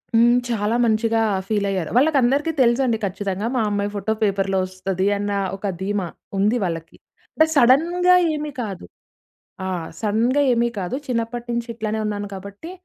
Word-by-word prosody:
హ్మ్. 235 Hz, +1 st, +5 dB
చాలా 220 Hz, -1 st, 0 dB
మంచిగా 225 Hz, 0 st, +2 dB, 0.3 s
ఫీల్ 205 Hz, -1 st, 0 dB
అయ్యారు. 185 Hz, -5 st, -2 dB
వాళ్ళకి 290 Hz, +2 st, +4 dB
అందరికి 280 Hz, +6 st, +2 dB
తెలుసండి 240 Hz, -1 st, +3 dB
ఖచ్చితంగా 200 Hz, +2 st, -3 dB
మా 245 Hz, -, +2 dB
అమ్మాయి 205 Hz, 0 st, -1 dB
ఫోటో 205 Hz, +2 st, -1 dB
పేపర్‌లో 195 Hz, -1 st, +1 dB
వస్తది 185 Hz, 0 st, -2 dB
అన్న 205 Hz, 0 st, -2 dB, 0.2 s
ఒక 195 Hz, +1 st, -3 dB
ధీమా 195 Hz, -2 st, -1 dB, 0.3 s
ఉంది 210 Hz, +5 st, +2 dB
వాళ్ళకి. 165 Hz, -2 st, -4 dB, 0.4 s
బా 315 Hz, -, +7 dB
సడెన్‌గా 335 Hz, +8 st, +5 dB, 0.2 s
ఏమి 300 Hz, -1 st, -4 dB
కాదు. 195 Hz, -6 st, -6 dB, 0.8 s
ఆ! -, -, -2 dB, 0.3 s
సడెన్‌గా 230 Hz, +6 st, +2 dB
ఏమి 235 Hz, 0 st, +2 dB
కాదు. 180 Hz, +6 st, -3 dB
చిన్నప్పటి 235 Hz, -1 st, -2 dB
నుంచి 235 Hz, 0 st, -2 dB
ఇట్లానే 220 Hz, -1 st, -2 dB
ఉన్నాను 205 Hz, -1 st, -3 dB
కాబట్టి 200 Hz, -, -9 dB
220 Hz, 150 wpm, -22 LUFS, 200-245 Hz, 0.8 s, బా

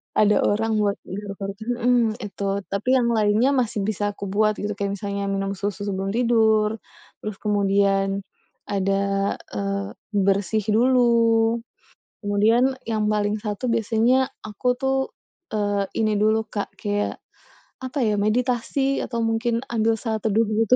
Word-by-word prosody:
ada 210 Hz, 0 st, +4 dB
orang 220 Hz, +1 st, +1 dB
buat 205 Hz, -1 st, +1 dB
garuk-garuk 200 Hz, 0 st, -6 dB, 0.2 s
mhm, 240 Hz, -2 st, +2 dB
itu. 200 Hz, -1 st, -6 dB, 0.3 s
Tapi 200 Hz, +6 st, -2 dB
yang 240 Hz, -2 st, +2 dB
lainnya 220 Hz, +3 st, +3 dB
masih 240 Hz, -6 st, 0 dB
bisa 205 Hz, 0 st, -2 dB
kubuat 210 Hz, +2 st, +1 dB
gitu, 210 Hz, -, -1 dB
kayak 200 Hz, 0 st, -1 dB
misalnya 200 Hz, 0 st, -3 dB
minum 195 Hz, 0 st, -1 dB
susu 205 Hz, 0 st, -3 dB
sebelum 195 Hz, -1 st, -2 dB
tidur, 220 Hz, -2 st, +3 dB, 0.4 s
terus 215 Hz, -2 st, -5 dB
kemudian, 195 Hz, -1 st, +1 dB, 0.4 s
ada, 195 Hz, 0 st, 0 dB, 0.2 s
eee, 200 Hz, 0 st, -2 dB, 0.2 s
bersih 200 Hz, +1 st, +1 dB
dulu, 230 Hz, -1 st, +3 dB, 0.6 s
kemudian 220 Hz, +6 st, +3 dB, 0.2 s
yang 215 Hz, -1 st, 0 dB
paling 210 Hz, 0 st, +1 dB
satu 210 Hz, +3 st, -3 dB
biasanya, 230 Hz, +3 st, +2 dB, 0.2 s
aku 215 Hz, +4 st, -5 dB
tuh, 265 Hz, 0 st, +1 dB, 0.6 s
eee, 205 Hz, -2 st, 0 dB, 0.2 s
ini 215 Hz, -1 st, +2 dB
dulu 220 Hz, +1 st, +2 dB
Kak, 205 Hz, -1 st, -4 dB
kayak 205 Hz, 0 st, -2 dB, 0.6 s
apa 260 Hz, +3 st, -3 dB
ya, 210 Hz, -, +2 dB
meditasi 250 Hz, +5 st, 0 dB
atau 235 Hz, -2 st, -4 dB
mungkin 225 Hz, +1 st, 0 dB
ambil 225 Hz, -1 st, +2 dB
saat 220 Hz, -2 st, -2 dB
teduh, 220 Hz, +1 st, +3 dB
begitu 220 Hz, +2 st, +3 dB
215 Hz, 135 wpm, -23 LUFS, 200-230 Hz, 0.6 s, ada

